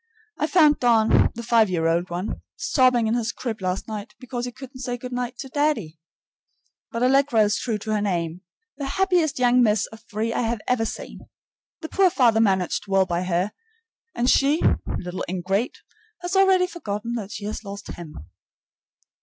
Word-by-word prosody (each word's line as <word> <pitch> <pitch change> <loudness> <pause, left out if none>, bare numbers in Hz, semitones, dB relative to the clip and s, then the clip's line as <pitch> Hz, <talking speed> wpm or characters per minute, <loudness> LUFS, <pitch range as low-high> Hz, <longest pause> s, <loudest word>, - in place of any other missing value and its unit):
I 305 - +1
found 305 -3 +5
Don, 230 -3 +4
the 235 - -6
five 225 -2 +4
year 170 -3 0
old 170 +2 +1
one, 175 +4 -4
sobbing 255 -3 +3
in 220 - +1
his 235 -1 0
crib 225 -5 -5
last 185 +1 -2
night 215 0 -7
because 245 -1 -4
he 245 - -5
couldn't 260 +1 -11
say 245 -1 -3
good 250 +1 -8
night 245 0 -3
to 270 - -6
"daddy." 260 - -1 0.9
But 230 +1 -2
Allegra 270 -2 +4
is 210 0 +1
true 225 -4 -1
to 215 +1 -5
her 210 -1 +1
name, 175 -3 -2 0.4
the 280 - -4
happiest 360 -6 +2
young 250 0 +4
miss 215 -3 +3
of 220 - -13
three 220 +2 -2
I - - 0
have 230 -1 -1
ever 245 -3 +1
seen. - - -8 0.5
The 320 - -6
poor 390 -1 +4
father 235 -8 +3
managed 190 -2 +1
well 195 -1 +3
by 175 -1 -1
her, 180 +3 0 0.6
and 240 - 0
she, 280 +4 +3 0.3
little 180 +1 -4
ingrate, 190 +6 -1 0.5
has 355 +2 -2
already 380 -1 +5
forgotten 235 - -5
that 210 -4 -4
she 205 - -6
has 215 +1 -5
lost 200 -1 -8
him. 155 - -10
230 Hz, 180 wpm, -24 LUFS, 200-255 Hz, 0.9 s, found